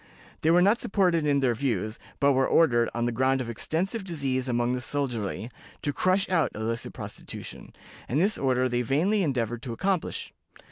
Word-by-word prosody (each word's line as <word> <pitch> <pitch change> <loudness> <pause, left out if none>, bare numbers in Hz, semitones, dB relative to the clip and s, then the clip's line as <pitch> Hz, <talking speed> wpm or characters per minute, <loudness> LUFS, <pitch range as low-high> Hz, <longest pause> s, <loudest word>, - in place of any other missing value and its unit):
They 155 - +2
were 175 +2 +6
not 210 +5 +3
supported 180 -6 +2
in 140 -1 +3
their 125 -3 +3
views, 110 -4 -2 0.2
but 140 0 +4
were 130 0 +2
ordered, 120 -8 +4
on 120 0 -1
the 120 - 0
ground 130 +3 +2
of 120 -2 -3
extensive 185 - -2
disease 135 -7 -2
among 120 0 +1
the 125 0 -1
soldiery, 120 -5 -3 0.3
to 145 - -1
"crush 185 +5 +2
out" 165 -7 +2
the 110 - -6
illicit 115 +1 -2
prostitution, - - -8 0.4
and 135 - +1
this 200 +5 +3
order 130 -1 +1
they 120 -1 0
vainly 165 - +2
endeavored 120 - -1
to 125 -3 -5
accomplish. 190 +8 -2
135 Hz, 185 wpm, -27 LUFS, 120-165 Hz, 0.4 s, were